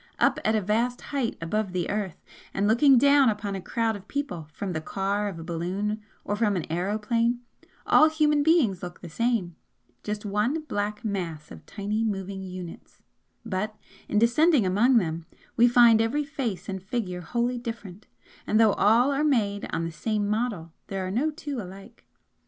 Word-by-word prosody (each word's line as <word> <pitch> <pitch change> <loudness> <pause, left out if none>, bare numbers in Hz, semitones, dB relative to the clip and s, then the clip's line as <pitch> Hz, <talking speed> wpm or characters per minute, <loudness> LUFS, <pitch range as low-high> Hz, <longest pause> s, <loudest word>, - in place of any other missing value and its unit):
Up - - +2
at 220 - +2
a 215 - +2
vast 230 +5 0
height 260 -5 -1
above 195 +3 -2
the 180 -2 -1
Earth, 200 -4 -4 0.3
and 200 +1 +1
looking 255 +5 +5
down 280 0 +5
upon 205 -2 -3
a 195 - -4
crowd 225 +3 -1
of 200 -1 -11
people 275 - -4
from 190 +3 -4
the 160 - -3
car 200 +4 -1
of 185 - -8
a 165 - -7
balloon, 185 +6 -3 0.2
or 205 - -1
from 210 -2 +1
an 175 - -2
aeroplane, 220 +7 0 0.4
all 310 - +6
human 300 -2 +2
beings 285 - +3
look 175 0 -8
the 175 - -8
same 215 -2 -1 0.5
just 210 0 -4
one 210 +10 0
black 210 -5 -3
mass 170 -7 -4
of - - -11
tiny 210 +2 -2
moving 195 -2 -3
units; 180 -2 -9 0.4
but, 215 0 -3 0.3
in - - 0
descending 250 - +4
among 225 +7 +4
them, 165 -5 -1 0.3
we 240 +1 +6
find 235 -2 +6
every 265 +7 0
face 250 - -4
and 190 -1 -4
figure 190 -3 -3
wholly 240 +6 -1
different, 220 -5 -8 0.4
and 215 - +3
though 220 -3 +5
all 235 +6 +4
are 280 +2 0
made 210 -9 +1
on 165 - -1
the 165 - -4
same 210 +5 -1
model 210 -7 -2
there 195 -1 -3
are 185 - -3
no 260 +10 +1
two 290 -4 -5
alike. 195 +5 -12
210 Hz, 180 wpm, -26 LUFS, 190-240 Hz, 0.5 s, all